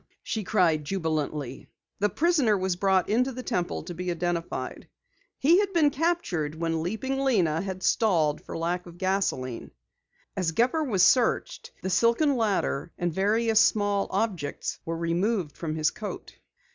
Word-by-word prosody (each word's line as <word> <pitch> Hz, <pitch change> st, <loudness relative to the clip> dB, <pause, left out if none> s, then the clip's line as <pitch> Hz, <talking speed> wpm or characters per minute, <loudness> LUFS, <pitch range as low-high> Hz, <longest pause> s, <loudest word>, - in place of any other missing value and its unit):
she 220 Hz, -, -3 dB
cried 175 Hz, -6 st, +2 dB
jubilantly. 150 Hz, -5 st, -3 dB, 0.3 s
The 205 Hz, +1 st, +2 dB
prisoner 285 Hz, -, +2 dB
was 190 Hz, -1 st, -1 dB
brought 190 Hz, 0 st, +2 dB
into 250 Hz, +5 st, +1 dB
the 255 Hz, 0 st, -7 dB
Temple 180 Hz, -9 st, -2 dB
to 175 Hz, +2 st, -7 dB
be 180 Hz, +2 st, -4 dB
identified. 175 Hz, 0 st, -3 dB, 0.5 s
He 335 Hz, +7 st, +5 dB
had 400 Hz, -1 st, 0 dB
been 310 Hz, -4 st, +4 dB
captured 265 Hz, -, -1 dB
when 165 Hz, 0 st, -1 dB
Leaping 220 Hz, +10 st, -2 dB
Lena 185 Hz, -, +2 dB
had 190 Hz, -1 st, -5 dB
stalled 160 Hz, -9 st, +2 dB
for -, -, -7 dB
lack 175 Hz, +2 st, -2 dB
of 170 Hz, 0 st, -12 dB
gasoline. 185 Hz, -10 st, -1 dB, 0.7 s
As 175 Hz, -4 st, -1 dB
Gepper 255 Hz, -, +2 dB
was 205 Hz, -10 st, +2 dB
searched, 255 Hz, -, +2 dB
the 190 Hz, -, -2 dB
silken 235 Hz, -, +3 dB
ladder, 200 Hz, -, 0 dB
and 175 Hz, -2 st, -1 dB
various 220 Hz, +4 st, +2 dB
small 205 Hz, -2 st, +2 dB
objects 180 Hz, -11 st, -2 dB
were 165 Hz, 0 st, -3 dB
removed 170 Hz, -1 st, -1 dB
from 155 Hz, -2 st, -4 dB
his 155 Hz, 0 st, +1 dB
coat. -, -, -7 dB
190 Hz, 150 wpm, -27 LUFS, 165-230 Hz, 0.7 s, He